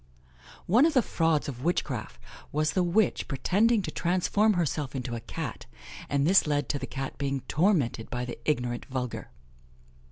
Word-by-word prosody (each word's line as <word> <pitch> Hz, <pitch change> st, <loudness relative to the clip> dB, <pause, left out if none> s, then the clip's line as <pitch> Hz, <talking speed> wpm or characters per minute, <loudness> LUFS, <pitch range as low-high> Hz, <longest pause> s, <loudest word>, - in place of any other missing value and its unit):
One 240 Hz, -, +5 dB
of 325 Hz, -, -2 dB
the 255 Hz, -, +5 dB
frauds 165 Hz, -5 st, +1 dB
of 125 Hz, -3 st, -6 dB
witchcraft 125 Hz, -, -2 dB, 0.3 s
was 155 Hz, +1 st, +1 dB
the 185 Hz, -, +2 dB
witch 180 Hz, +3 st, +1 dB
pretending 205 Hz, -, +2 dB
to -, -, -4 dB
transform 185 Hz, +5 st, +2 dB
herself 150 Hz, -6 st, -1 dB
into 125 Hz, -2 st, -3 dB
a 115 Hz, -, -3 dB
Cat, -, -, -6 dB, 0.4 s
and 140 Hz, 0 st, +1 dB
this 185 Hz, 0 st, +5 dB
led 145 Hz, -3 st, 0 dB
to 145 Hz, -, 0 dB
the -, -, -5 dB
Cat 135 Hz, 0 st, -5 dB
being 140 Hz, -1 st, -1 dB
tormented 150 Hz, -, +1 dB
by 125 Hz, 0 st, -3 dB
the 125 Hz, -, -7 dB
ignorant 125 Hz, -5 st, -1 dB
vulgar. 130 Hz, -3 st, -4 dB
150 Hz, 165 wpm, -28 LUFS, 130-180 Hz, 0.4 s, One